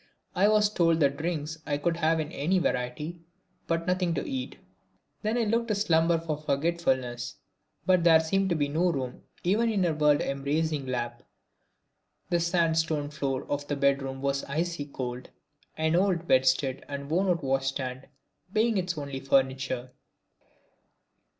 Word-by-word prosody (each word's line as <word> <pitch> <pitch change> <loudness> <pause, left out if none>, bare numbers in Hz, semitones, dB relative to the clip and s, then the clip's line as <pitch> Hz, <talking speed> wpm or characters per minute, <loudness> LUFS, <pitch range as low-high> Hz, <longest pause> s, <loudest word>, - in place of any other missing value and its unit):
I 195 +3 +4
was 210 0 +4
told 165 -5 +2
that 140 -1 +3
drinks 160 -1 -3
I 145 -2 -1
could 165 +3 0
have 160 0 +2
in 155 0 -3
any 170 +7 +1
variety 150 +3 -2 0.5
but 165 0 0
nothing 180 -2 +1
to - - -3
eat. 265 -3 -4 0.6
Then 220 +2 0
I 240 - +2
looked 230 +2 +1
to 215 - 0
slumber 170 -4 +3
for 160 -2 -3
forgetfulness, 135 -6 -1 0.5
but 185 -2 +4
there 165 -2 +7
seemed 190 +4 +1
to 170 - +1
be 145 -2 +1
no 170 +5 +1
room 130 -5 -4 0.2
even 215 +6 +2
in 205 -4 +1
her 170 -3 +2
world 150 -1 +3
embracing 140 +1 -1
lap. 120 -1 -3 1.1
The 175 - +3
sand 170 -1 +2
stone 150 -3 -1
floor 135 -3 -2
of 145 0 -3
the 145 - -1
bed 140 0 +2
room 135 0 -5
was 140 0 0
icy 165 +1 -2
cold, 125 -3 -6 0.5
an 160 +1 +1
old 180 -2 +1
bedstead 130 +1 +2
and 140 -1 -5
worn 180 +6 +1
out 170 -3 +1
wash 135 0 0
stand 130 -1 -4 0.4
being 220 0 +2
its 180 -2 -2
only 140 -2 -4
furniture. 130 -2 0
155 Hz, 165 wpm, -28 LUFS, 135-175 Hz, 1.1 s, there